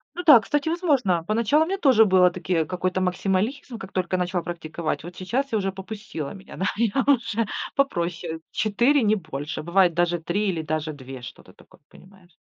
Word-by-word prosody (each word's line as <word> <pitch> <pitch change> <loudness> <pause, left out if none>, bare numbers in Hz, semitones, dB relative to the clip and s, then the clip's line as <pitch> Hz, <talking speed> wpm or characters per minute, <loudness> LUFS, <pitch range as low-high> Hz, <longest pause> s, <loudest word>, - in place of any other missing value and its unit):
Ну 355 - -4
да, 290 -7 +9
кстати, 295 +8 -1
возможно. 275 - +1
Поначалу 230 +8 +2
мне 390 +3 -2
тоже 255 - +5
было, 185 -2 +5
такие 175 -3 -1
какой-то 185 +2 -2
максимализм, 200 +8 -1
как 195 -2 -9
только 185 0 -1
я - - 0
начала 180 0 -1
практиковать. 165 -2 -4
Вот 175 +1 -9
сейчас 255 +9 -2
я 220 - +1
уже 195 -1 -1
попустило 190 -6 -7
меня, 195 -1 -12
да, 190 - -1
я 235 +3 +1
уже 230 -5 +2 0.3
попроще, 170 -10 -1
4, 240 +6 +2
не 215 0 +3
больше. 155 -4 -5
Бывает 175 0 +3
даже 175 0 +1
3 185 +6 -1
или 165 -3 -2
даже 155 0 -3
2, 130 -2 -10
что-то 120 - -12
такое, - - -21
понимаешь. 185 -1 -19
190 Hz, 185 wpm, -24 LUFS, 170-230 Hz, 0.3 s, да